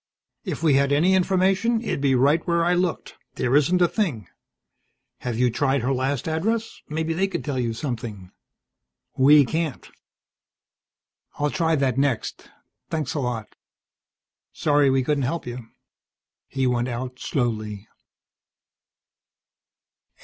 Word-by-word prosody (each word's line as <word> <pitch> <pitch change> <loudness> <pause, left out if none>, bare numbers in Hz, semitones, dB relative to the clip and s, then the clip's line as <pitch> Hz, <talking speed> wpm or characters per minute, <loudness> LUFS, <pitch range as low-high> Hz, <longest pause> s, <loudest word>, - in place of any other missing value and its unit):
"If - - -4
we 155 -3 +4
had 140 +1 +3
any 165 +7 +3
information, 190 +5 +2
it'd 220 - -3
be 135 -2 +3
right 140 +6 +3
where 170 -1 +2
I 175 - +3
looked. 180 -1 -2 0.2
There 125 +2 +1
isn't 175 +5 +4
a - - +5
thing. 155 - -2 0.9
Have 120 -2 -3
you 125 0 +2
tried 135 +2 +1
her 135 +2 +1
last 130 +1 -1
address? 215 +8 -2
Maybe 160 +1 -1
they 190 +4 +1
could 175 -3 -5
tell 140 -4 -2
you 120 -2 0
something. 115 -6 -5 0.8
We 145 +2 +6
can't." 160 0 -3 1.5
"I'll 145 0 0
try 165 -1 +1
that 135 -2 0
next. 135 -5 -1 0.4
Thanks 155 -5 -2
a 150 - -2
lot." 120 -5 -4 1.0
"Sorry 145 -2 +2
we 130 0 +2
couldn't 145 +2 0
help 140 +6 -2
you." 120 -1 -7 0.8
He 135 -1 -2
went 125 -1 +1
out 125 +1 -5
slowly. 110 -5 -2
140 Hz, 135 wpm, -24 LUFS, 125-165 Hz, 1.5 s, We